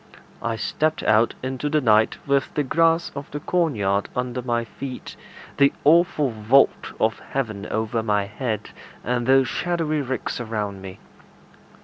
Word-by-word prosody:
I 115 -1 -1
stepped 155 +7 -1
out 110 +2 +3
into 130 +3 -2
the 155 +1 +2
night 110 -4 +3
with 140 -1 +1
the 150 - +1
grass 165 +4 +2
of 140 0 -7
the 145 - -5
corn 165 -2 0
yard 100 -1 0
under 125 0 -2
my 120 -1 -1
feet, 130 +3 -8 0.4
the 140 0 +5
awful 155 -3 +4
vault 115 +5 +2
of 110 0 +1
heaven 110 -7 -4
over 110 +1 -1
my 105 -2 +1
head, 105 +1 -4 0.3
and 120 -1 -1
those 135 -1 +5
shadowy 165 -2 -1
ricks 130 -2 -3
around 105 -4 -4
me. 95 -1 -9
125 Hz, 150 wpm, -23 LUFS, 110-145 Hz, 0.4 s, the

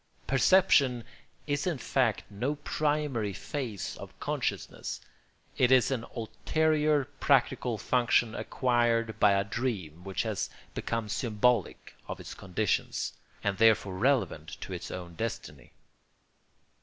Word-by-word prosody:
Perception 135 -3 +4 0.4
is 145 +2 -1
in 170 -5 0
fact 125 -4 +1
no 125 +9 -2
primary 145 -7 -1
phase 110 - -4
of - - -11
consciousness; - - -3 0.6
it 125 0 +4
is 130 0 +5
an 120 -3 -1
ulterior 150 +5 +1
practical 125 -3 +2
function 120 0 +2
acquired 115 -4 +1
by 105 -1 +6
a 100 0 +2
dream 95 -8 -3
which 95 0 -2
has 110 -4 -2 0.2
become 115 -2 -2
symbolic 115 -1 0
of - - -5
its - - -8
conditions, 95 +2 -1 0.3
and 100 -2 -1
therefore 110 -3 +4
relevant 115 - 0
to - - -6
its - - -6
own 90 -2 -7
destiny. 115 +6 -5
115 Hz, 120 wpm, -29 LUFS, 105-135 Hz, 0.6 s, by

